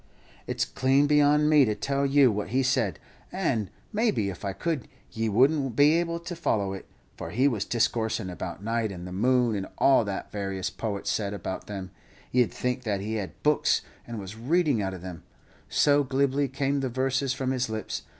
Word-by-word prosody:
"It's - - 0
clean 135 +2 +2
beyond 150 0 +4
me 150 -2 +6
to 110 -4 +1
tell 140 +5 0
you 135 -3 +5
what 105 0 -3
he 130 +4 +1
said; 125 - +1 0.3
and, 130 - -1 0.2
maybe, 210 - +1
if 90 - -11
I 100 - -1
could, 155 - -3 0.2
ye 110 0 -1
would 125 +8 +5
n't 135 -6 -2
be 145 +3 +6
able 170 -1 -2
to 175 +1 -6
follow 100 - 0
it, 95 - -8 0.3
for - - -6
he 130 +6 +2
was 110 -7 -1
discoorsin' 110 -3 0
about 90 +1 -6
night 115 -1 -1
and 90 -2 -7
the 90 - -7
moon, 120 +3 +2
and 95 -1 -3
all 135 -3 +5
that 100 -1 -5
various 95 -1 -3
poets 105 -3 -3
said 100 -1 -2
about 95 -1 -5
them; 95 -3 -6 0.4
ye'd 125 -2 +3
think 125 0 -2
that 105 -5 -1
he 110 +2 -2
had 95 -5 -9
books, - - +3 0.3
and 120 -1 -6
was 100 0 -7
reading 145 +1 +1
out 95 -1 -2
of 90 - -10
them, 90 -3 -7 0.5
so 145 0 +4
glibly 140 +1 +1
came 140 +1 -1
the 135 -1 -1
verses 130 +1 0
from 130 0 -1
his 125 -2 -1
lips. 110 -1 -4
120 Hz, 200 wpm, -27 LUFS, 100-140 Hz, 0.5 s, me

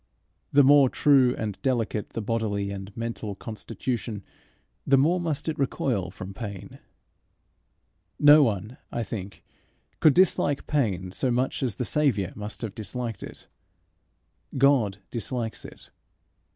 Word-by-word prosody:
The 145 0 +6
more 140 -1 +6
true 130 -3 +4
and 105 -3 -5
delicate 115 -6 -1
the 115 - -3
bodily 100 -3 -1
and 95 0 -7
mental 115 -3 -4
constitution, 110 0 -5 0.6
the 135 - +4
more 165 +7 +3
must 160 -4 -2
it 155 -2 -2
recoil 125 -8 -1
from 95 0 -8
pain. 100 -2 -8 1.4
No 145 +1 +8
one, 110 -1 -1
I 120 - -2
think, 100 -3 -7 0.6
could 155 -3 +5
dislike 150 -6 +3
pain 95 -11 -1
so 130 - -1
much 125 +2 0
as 125 -7 -1
the 125 - -3
Saviour 120 - +1
must 105 +3 -6
have 110 -4 -4
disliked 115 0 -5
it. - - -10 1.1
God 130 -8 +3
dislikes 115 -1 -4
it. - - -13
115 Hz, 130 wpm, -26 LUFS, 100-135 Hz, 1.4 s, No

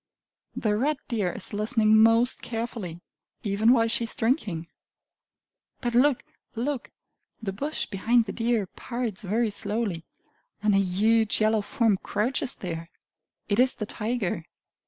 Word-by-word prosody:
The 210 -2 +1
red 285 +7 +1
deer 210 -7 0
is - - -6
listening 215 +1 +3
most 225 +3 +4
carefully, 225 -7 -5 0.4
even 210 +3 +3
while 230 -3 +4
she 230 +1 +1
is 225 - -2
drinking! 220 - 0 1.1
But 240 -2 -2
look, 255 +2 +4 0.3
look! 255 +3 -2 0.5
The 195 -4 -4
bush 290 +10 -3
behind 225 +4 +2
the 195 - -4
deer 230 -2 0
parts 235 +1 -4
very 215 +3 0
slowly, 205 -4 -2 0.6
and 210 -1 +3
a 195 - +5
huge 215 +4 +2
yellow 215 0 +3
form 220 -1 +1
crouches 245 +8 0
there! 165 -2 -6 0.6
It 205 +1 +1
is 255 +1 +4
the 210 - -4
tiger! 210 -7 -2
220 Hz, 135 wpm, -26 LUFS, 200-240 Hz, 1.1 s, a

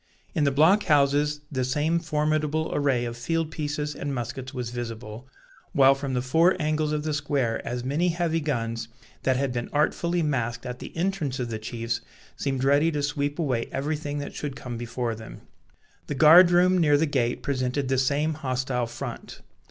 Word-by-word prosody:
In 155 -5 +1
the 140 - +3
block 165 +9 +4
houses 145 0 +3
the 130 -3 -1
same 150 +6 +1
formidable 155 -1 0
array 135 -4 +1
of 120 0 -4
field 160 +6 -2
pieces 150 -1 -3
and 140 -1 -4
muskets 125 +2 -5
was 125 -3 -4
visible; 115 0 -6 0.5
while 135 -1 +6
from 135 -1 -4
the 125 - 0
four 165 +8 +3
angles 155 -1 0
of 150 -1 -1
the 155 -1 -1
square 140 -5 0
as 120 0 -3
many 145 +7 0
heavy 170 -1 0
guns, 115 -6 -2 0.3
that 130 -1 +1
had 135 -1 -1
been 120 -1 -3
artfully 170 +3 +1
masked 120 -5 -1
at 125 0 -5
the - - -8
entrance 170 -7 -1
of 120 -3 -3
the 110 - -3
chiefs, 115 +1 -3 0.3
seemed 135 -2 -2
ready 145 +4 +4
to 145 -2 -2
sweep 145 0 -1
away 130 -8 -1
everything 145 +1 -2
that 145 0 -5
should 145 -3 -5
come 125 -3 -6
before 120 0 -3
them. 110 0 -10 0.7
The 145 - -3
guard 165 +5 +8
room 180 +1 +4
near 150 -3 +4
the 160 - +2
gate 125 -5 -1
presented 130 0 -1
the 130 0 +1
same 145 +4 +1
hostile 130 -4 -2
front. 120 +1 -7
140 Hz, 185 wpm, -26 LUFS, 125-155 Hz, 0.7 s, guard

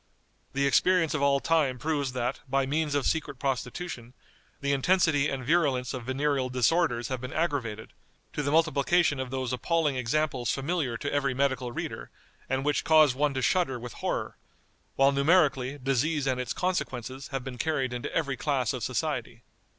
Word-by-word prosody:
The 140 +1 +1
experience 165 +4 +3
of 155 - -1
all 140 0 +3
time 145 -5 +1
proves 145 -1 -1
that, 125 +1 -2
by 135 0 +2
means 150 +1 0
of 145 - +1
secret 155 -4 -1
prostitution, 130 -1 -4 0.4
the 140 -1 -1
intensity 150 0 +3
and 130 -2 -4
virulence 140 -5 +1
of 125 -3 -6
venereal 135 0 0
disorders 125 0 +1
have 130 -2 -3
been 125 +1 -6
aggravated, 130 -10 -2 0.4
to - - -2
the 145 - -1
multiplication 155 0 +3
of 130 -1 -3
those 130 -1 -3
appalling 150 +1 0
examples 130 -1 0
familiar 135 -4 -1
to 145 - -4
every 140 -2 0
medical 130 -2 0
reader, - - -5 0.4
and 135 +1 -1
which 150 - +1
cause 155 -3 +5
one 140 +1 0
to 130 - -1
shudder 135 0 +1
with 120 0 -8
horror; - - -3 0.6
while 135 +1 +5
numerically, 140 -2 +2
disease 135 +3 0
and 130 -1 0
its 125 - -4
consequences 135 -8 -3
have 135 -2 -4
been 125 -2 -7
carried 135 -4 0
into 120 - -4
every 140 -5 -1
class 130 -5 0
of 130 - -4
society. 125 -4 -3
135 Hz, 170 wpm, -28 LUFS, 125-150 Hz, 0.6 s, cause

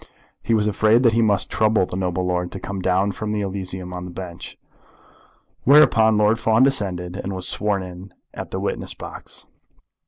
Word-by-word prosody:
He 115 - +1
was 105 -1 +1
afraid 110 +3 +3
that 115 -2 +4
he 115 - +3
must 105 -4 +1
trouble 110 -3 +2
the 90 - -7
noble 90 -1 -1
lord 90 -1 -1
to 95 - -5
come 100 0 -5
down 95 +2 +1
from 105 +2 -4
the 105 -1 -1
Elysium 95 -2 -4
of 90 0 -5
the 90 - -7
bench. 90 -1 -8 1.1
Whereupon 115 -6 +5
Lord 105 +2 +3
Fawn 110 +2 +3
descended, 95 -9 +1
and 100 0 -4
was 95 -1 -5
sworn 100 -2 -1
in 90 +1 -10 0.2
at - - -7
the - - -4
witness - - -4
box. - - -8
100 Hz, 185 wpm, -22 LUFS, 90-110 Hz, 1.1 s, Whereupon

